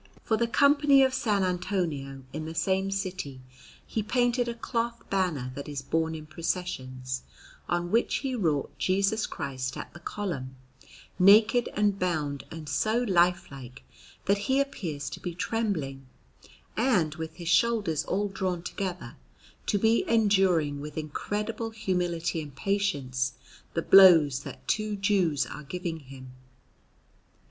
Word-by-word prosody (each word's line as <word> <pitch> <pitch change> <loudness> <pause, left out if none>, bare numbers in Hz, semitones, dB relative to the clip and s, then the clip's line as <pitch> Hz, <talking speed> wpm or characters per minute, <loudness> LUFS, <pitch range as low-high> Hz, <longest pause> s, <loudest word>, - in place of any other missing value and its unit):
For 220 - +1
the 235 +1 +1
Company 280 +3 +5
of 260 - +3
S. 265 -1 -3
Antonio, 180 -8 -1
in 155 +1 -4
the 160 +1 -6
same 190 +4 +1
city, 185 -8 -4 0.5
he 220 - -2
painted 245 +2 +1
a 235 - -3
cloth 235 0 -3
banner 170 -10 0
that 140 +2 -7
is 140 -2 -5
borne 160 +2 0
in 155 -1 -8
processions, 130 -6 -3 0.5
on 175 0 -1
which 230 +2 +2
he 270 -2 -2
wrought 160 - 0
Jesus 200 +3 +1
Christ 130 -1 -4
at - - -7
the 175 - -11
Column, 165 -9 -4 0.6
naked 215 +5 +6
and 205 -1 +1
bound 150 -6 -1
and 160 -2 -8
so 215 +11 +1
lifelike, 170 - 0 0.4
that 200 +1 +2
He 265 +6 +1
appears 165 - -3
to - - -7
be 175 -2 -5
trembling, 160 - -2 0.7
and, 210 - +2
with 160 0 -6
His 170 -2 -5
shoulders 190 -5 +2
all 205 +1 0
drawn 185 -3 -3
together, 185 -1 -5 0.5
to 205 - +2
be 225 +3 +3
enduring 190 -10 +3
with 150 +1 -8
incredible 210 +9 -3
humility 175 -6 -1
and 145 -3 -10
patience 140 -9 -1 0.4
the 165 - 0
blows 165 -8 +7
that - - -10
two 215 -1 0
Jews 195 -7 +1
are 150 - -8
giving 165 +2 -5
Him. 130 -2 -12
180 Hz, 140 wpm, -28 LUFS, 150-210 Hz, 0.7 s, blows